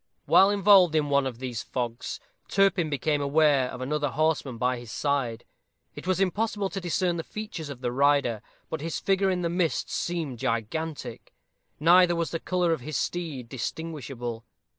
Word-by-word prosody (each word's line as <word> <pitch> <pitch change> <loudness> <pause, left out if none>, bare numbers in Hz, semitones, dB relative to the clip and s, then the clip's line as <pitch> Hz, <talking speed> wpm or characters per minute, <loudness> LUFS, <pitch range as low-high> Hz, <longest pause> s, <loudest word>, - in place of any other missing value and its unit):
While 195 - +6
involved 195 -4 +5
in 150 -2 +1
one 140 -1 +3
of 125 -3 -6
these 125 -2 -4
fogs, 120 -2 -4 0.3
Turpin 195 -4 +2
became 145 +1 0
aware 140 -2 +3
of 125 - -7
another 145 +2 -1
horseman 150 -3 0
by 125 +1 0
his 120 -1 -10
side. 135 -6 -1 0.5
It - - -9
was 185 0 +1
impossible 200 +1 0
to 195 - -4
discern 175 0 0
the 165 - -3
features 210 -8 -6
of 135 -3 -8
the 120 - -1
rider, 140 -4 +2 0.3
but 160 - -4
his 165 +1 -3
figure 195 0 +2
in 180 -1 -1
the - - +1
mist 170 -1 -1
seemed 160 -8 -3
gigantic; 135 +6 -3 0.4
neither 175 +2 +6
was 170 -1 -2
the 165 - -2
color 180 -1 +1
of 160 - -3
his 150 +3 -3
steed 155 -9 -3
distinguishable. 130 -3 -5
155 Hz, 170 wpm, -27 LUFS, 130-175 Hz, 0.5 s, While